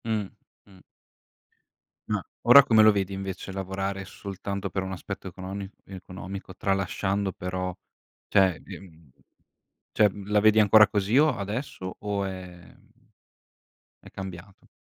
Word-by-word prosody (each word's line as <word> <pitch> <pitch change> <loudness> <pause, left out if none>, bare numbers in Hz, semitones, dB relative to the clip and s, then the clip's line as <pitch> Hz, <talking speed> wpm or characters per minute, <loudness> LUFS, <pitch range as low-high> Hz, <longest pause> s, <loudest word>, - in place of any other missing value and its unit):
Mh, 110 -3 -1 0.4
mh. 95 -2 -19 1.3
Uhm, - - 0 0.2
ora 125 +4 +9
come 110 -3 +5
lo 110 - +8
vedi 100 -1 -1
invece, 95 0 -5
lavorare 95 +1 -4
soltanto 100 0 -5
per 95 - -2
un 95 - -5
aspetto 95 0 -6
econoni 95 +2 -6 0.2
economico, 95 0 -9
tralasciando 95 0 -1
però, 90 0 -4 0.5
cioè 95 -5 +3
e, - - -9
mhmm 80 -5 -17 0.9
cioè 105 - +5 0.2
la 105 +1 +2
vedi 110 +1 +5
ancora 110 0 +7
così 105 +4 +1
o 150 -4 +4
adesso 105 -2 -5
o 100 -1 -2
è 95 -1 -6 0.2
mhmm, - - -26 1.1
è - - -15
cambiato? 95 0 -9
95 Hz, 130 wpm, -26 LUFS, 95-105 Hz, 1.3 s, ora